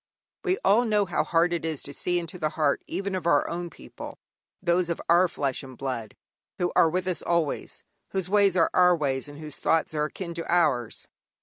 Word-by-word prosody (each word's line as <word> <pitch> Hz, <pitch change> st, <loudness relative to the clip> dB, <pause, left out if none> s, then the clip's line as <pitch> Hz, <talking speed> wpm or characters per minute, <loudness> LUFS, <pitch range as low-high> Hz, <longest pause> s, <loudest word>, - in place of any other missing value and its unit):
We 375 Hz, -1 st, +1 dB
all 210 Hz, +5 st, +5 dB
know 210 Hz, -2 st, +2 dB
how 175 Hz, -, 0 dB
hard 170 Hz, +1 st, +2 dB
it 170 Hz, -, -2 dB
is 160 Hz, -3 st, -3 dB
to 140 Hz, -, -8 dB
see 175 Hz, +3 st, 0 dB
into 175 Hz, +1 st, -5 dB
the 155 Hz, -2 st, 0 dB
heart 150 Hz, -3 st, +2 dB
even 195 Hz, 0 st, -3 dB
of 180 Hz, -3 st, -2 dB
our -, -, +3 dB
own 175 Hz, 0 st, -4 dB
people, 65 Hz, -, -10 dB, 0.4 s
those 175 Hz, -1 st, +1 dB
of 170 Hz, -, -2 dB
our 175 Hz, +2 st, +5 dB
flesh 140 Hz, -5 st, -2 dB
and 130 Hz, -3 st, -11 dB
blood 125 Hz, -5 st, -4 dB, 0.4 s
who 175 Hz, -1 st, 0 dB
are 165 Hz, -, +6 dB
with 180 Hz, +2 st, -1 dB
us 185 Hz, -, -1 dB
always, 170 Hz, -4 st, -1 dB, 0.3 s
whose 190 Hz, -3 st, -2 dB
ways 200 Hz, -1 st, +3 dB
are 165 Hz, -, +3 dB
our 180 Hz, -1 st, +5 dB
ways, 135 Hz, -2 st, -1 dB
and 145 Hz, 0 st, -11 dB
whose 150 Hz, -2 st, -7 dB
thoughts 165 Hz, -1 st, +1 dB
are 150 Hz, -1 st, 0 dB
akin 170 Hz, +2 st, -6 dB
to 165 Hz, 0 st, -4 dB
ours. 140 Hz, -10 st, +1 dB
170 Hz, 210 wpm, -26 LUFS, 150-180 Hz, 0.4 s, are